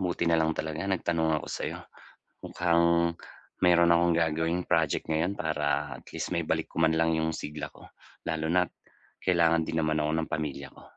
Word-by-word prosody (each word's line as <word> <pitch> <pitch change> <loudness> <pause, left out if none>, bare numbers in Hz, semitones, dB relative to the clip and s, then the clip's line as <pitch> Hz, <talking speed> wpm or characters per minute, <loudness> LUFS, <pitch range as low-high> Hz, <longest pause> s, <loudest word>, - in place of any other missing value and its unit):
Buti 90 -2 -1
na 85 -1 +3
lang 80 0 +1
talaga 80 +5 -3
nagtanong 85 -4 +1
ako - - -9
sa'yo, - - -4 0.6
mukhang 85 0 +2 0.5
mayroon 85 -1 +5
akong 85 0 +3
gagawing 80 +2 0
project 80 -4 +1
ngayon 80 +5 -1
para 80 -1 -1 0.5
at - - -41
least - - -4
maibalik - - -1
ko 80 - -3
man 80 0 +3
lang 80 0 +2
'yung 80 0 0
sigla 75 -1 -6
ko, - - -16 0.4
lalo 80 -1 -1
na't 90 0 +1 0.5
kailangan 85 -2 +3
din 80 +1 -2
naman 80 -1 +1
ako 75 - 0
ng 80 - -3
pamilya 75 -3 -3
ko. - - -16
80 Hz, 175 wpm, -28 LUFS, 80-85 Hz, 0.6 s, mayroon